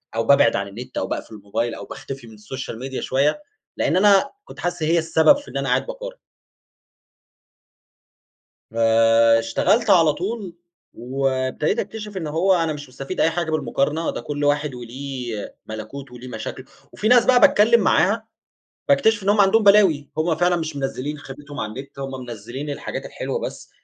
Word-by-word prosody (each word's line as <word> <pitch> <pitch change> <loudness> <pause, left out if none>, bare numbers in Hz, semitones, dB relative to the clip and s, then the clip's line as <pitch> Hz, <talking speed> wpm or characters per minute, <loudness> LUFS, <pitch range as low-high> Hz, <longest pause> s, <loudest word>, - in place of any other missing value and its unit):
أو 115 - +1
بابعد 140 -4 +5
عن 100 0 -2
النت، 115 +6 -9
أو 95 - -1
باقفل 110 - -5
الموبايل، 105 +3 -3
أو - - -8
باختفي 135 -3 -8
من 110 - -13
السوشيال 110 +2 -7
ميديا 130 0 -5
شوية، 140 - +1 0.4
لأن - - +1
أنا 205 +7 +4
كنت - - -13
حاسس 175 -2 -3
هي 165 +2 +3
السبب 165 - +4
في 290 - -12
إن - - -4
أنا - - -2
قاعد - - +1
باقارن. - - -7 2.5
آآ، 115 0 +4
اشتغلت 115 - +1
على 165 -5 +5
طول، 190 0 -5 0.4
وابتديت 130 - -1
أكتشف 210 -3 -6
إن 160 -4 -3
هو 170 +6 +2
أنا 165 -3 +1
مش 145 -2 -9
مستفيد 135 +8 -5
أي 165 - +4
حاجة 165 -1 -2
بالمقارنة، 155 +1 0
ده - - -6
كل 145 0 -4
واحد 145 -1 +1
وليه 125 -2 -6
ملكوته 125 +4 -8
وليه 125 +1 -10
مشاكله، 125 +2 -7 0.3
وفي 215 - -2
ناس 245 0 +6
بقى 250 -1 +5
باتكلم 235 -5 +5
معاها، 215 +4 +2 0.6
باكتشف 225 -7 +3
إن 200 - 0
هُم 205 0 +5
عندهم 205 +3 +4
بلاوي، 195 -8 +5
هُم 160 0 +1
فعلًا 175 +2 +2
مش 160 -2 -4
منزلين 140 +1 -3
خيبتهم 145 +1 -10
على 105 - -3
النت، 140 +2 -10
هُم 135 0 -4
منزلين 120 +5 -7
الحاجات 145 - -5
الحلوة - - -4
بس، - - -7
145 Hz, 170 wpm, -22 LUFS, 125-190 Hz, 2.5 s, ناس